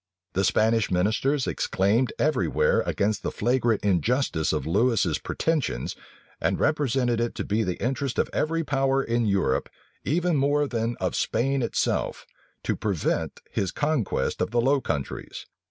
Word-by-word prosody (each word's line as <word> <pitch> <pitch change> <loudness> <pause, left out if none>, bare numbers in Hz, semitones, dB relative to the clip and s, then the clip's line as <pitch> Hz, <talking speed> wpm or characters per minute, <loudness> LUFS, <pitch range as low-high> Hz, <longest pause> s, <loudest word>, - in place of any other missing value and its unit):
The 95 - +1
Spanish 110 +2 +2
ministers 110 +10 +1
exclaimed 105 +7 +1
every 135 - +1
where - - +2
against 105 +1 0
the - - -2
flagrant 120 -1 +1
injustice 100 - +1
of - - -1
Lewis's 110 +7 +2
pretensions, 140 - -1 0.5
and - - 0
represented 130 -5 +1
it 120 - -2
to - - -3
be 105 +3 0
the 90 -5 -2
interest 130 +3 -2
of - - +2
every 165 +2 0
power 135 -2 +1
in 115 -1 0
Europe, 100 -1 +1 0.3
even 170 +1 +1
more 145 +1 +2
than 115 -1 -2
of - - -1
Spain 135 +2 0
itself, 115 - -1 0.4
to - - 0
prevent 100 -7 -2
his 95 -3 -1
conquest 145 - -1
of - - 0
the 120 +2 +1
Low 135 +3 +2
Countries. 70 - -4
120 Hz, 150 wpm, -26 LUFS, 100-135 Hz, 0.5 s, Spanish